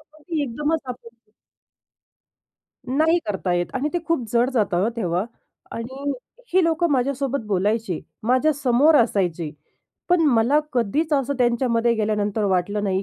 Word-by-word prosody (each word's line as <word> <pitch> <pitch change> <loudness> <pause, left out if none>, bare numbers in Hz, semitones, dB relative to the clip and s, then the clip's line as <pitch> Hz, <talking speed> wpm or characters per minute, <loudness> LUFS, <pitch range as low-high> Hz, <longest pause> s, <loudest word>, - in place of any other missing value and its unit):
कसं, 305 0 -23
की 320 -2 -2
एकदमच 295 +5 -1
आपण 235 -2 -10 1.6
नाही 315 +6 +3
करता 190 -3 -2
येत 175 0 0
आणि 275 +3 0
ते 350 - +1
खूप 330 -8 0
जड 240 +2 +3
जातं 200 -7 +1
हं, 225 - +2
तेव्हा 180 -2 -1 0.5
आणि 265 +5 -4 0.4
ही 375 - +4
लोकं 330 +1 +1
माझ्यासोबत 275 -1 0
बोलायची, 205 -1 0 0.2
माझ्यासमोर 270 +3 +3
असायचे, 180 - +1 0.6
पण 355 -1 +4
मला 240 +4 +3
कधीच 255 +7 0
असं 280 -1 +1
त्यांच्यामध्ये 235 -1 +2
गेल्यानंतर 210 -1 0
वाटलं 200 +2 0
नाही 190 -1 0
240 Hz, 135 wpm, -22 LUFS, 210-285 Hz, 1.6 s, ही